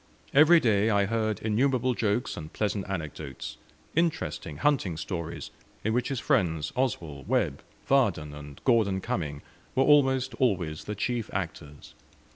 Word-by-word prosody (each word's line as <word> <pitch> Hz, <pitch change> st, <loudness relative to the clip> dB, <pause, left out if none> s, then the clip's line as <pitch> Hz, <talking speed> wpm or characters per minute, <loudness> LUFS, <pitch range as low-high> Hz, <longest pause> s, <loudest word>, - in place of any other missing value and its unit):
Every 155 Hz, +4 st, +7 dB
day 110 Hz, -5 st, +3 dB
I 100 Hz, -2 st, +3 dB
heard 110 Hz, -1 st, -1 dB
innumerable 125 Hz, +3 st, +2 dB
jokes 115 Hz, +2 st, 0 dB
and 75 Hz, -1 st, -8 dB
pleasant 100 Hz, -2 st, -2 dB
anecdotes; 75 Hz, -7 st, -5 dB, 0.4 s
interesting 160 Hz, -, -1 dB
hunting 100 Hz, -, +1 dB
stories, 85 Hz, -1 st, -5 dB, 0.3 s
in 110 Hz, -, 0 dB
which 120 Hz, +1 st, +1 dB
his 135 Hz, -3 st, -2 dB
friends 80 Hz, -8 st, +1 dB
Oswell, 85 Hz, -, -2 dB
Webb, -, -, +1 dB, 0.3 s
Vardon, 95 Hz, -, +2 dB
and 75 Hz, -1 st, -10 dB
Gorden 110 Hz, -6 st, +3 dB
Cumming 75 Hz, -6 st, -3 dB, 0.3 s
were 135 Hz, -, +4 dB
almost 135 Hz, -3 st, +4 dB
always 90 Hz, -11 st, 0 dB
the 105 Hz, -, -4 dB
chief 115 Hz, +2 st, -2 dB
actors. 80 Hz, -6 st, -6 dB
105 Hz, 135 wpm, -28 LUFS, 80-125 Hz, 0.4 s, Every